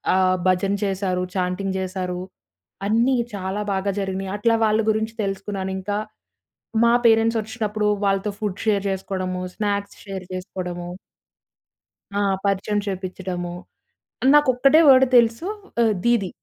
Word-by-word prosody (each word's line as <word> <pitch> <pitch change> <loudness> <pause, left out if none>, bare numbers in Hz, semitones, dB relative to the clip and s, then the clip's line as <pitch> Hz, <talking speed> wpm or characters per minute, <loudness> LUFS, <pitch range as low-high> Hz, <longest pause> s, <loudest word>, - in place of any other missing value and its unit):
ఆహ్, 185 0 +3
భజన 185 +2 +2
చేశారు. 190 -2 -1
చాంటింగ్ 185 +1 -1
జేశారు. 185 -1 -3 0.7
అన్నీ 235 +5 +3 0.2
చాలా 190 +1 -3
బాగా 195 +1 0
జరిగినయి. 190 -1 -3
అట్లా 230 +2 +2
వాళ్ళు 215 +1 +2
గురించి 220 +1 0
తెలుసుకున్నాను 195 -1 -3
ఇంక. 190 +2 -5 0.9
మా 235 - +5
పేరెంట్స్ 225 0 +4
వచ్చినప్పుడు 215 -1 -2 0.2
వాళ్ళతో 195 +1 +1
ఫుడ్ 205 -3 -3
షేర్ 205 -2 +2
చేసుకోడము. 185 -1 -3
Snacks 205 -1 -2
share 195 -2 -6
చేసుకోడము. 180 -2 -5 1.3
ఆ! 200 - +1 0.3
పరిచయం 200 +1 0
చేపిచ్చడము. 185 -2 -4 0.8
నాకొక్కటే 275 0 +5
వర్డ్ 265 -1 +8
తెలుసు 235 +7 +2 0.3
ఆహ్, 225 -2 +4
దీదీ. 235 -6 +2
195 Hz, 115 wpm, -22 LUFS, 185-220 Hz, 1.3 s, వర్డ్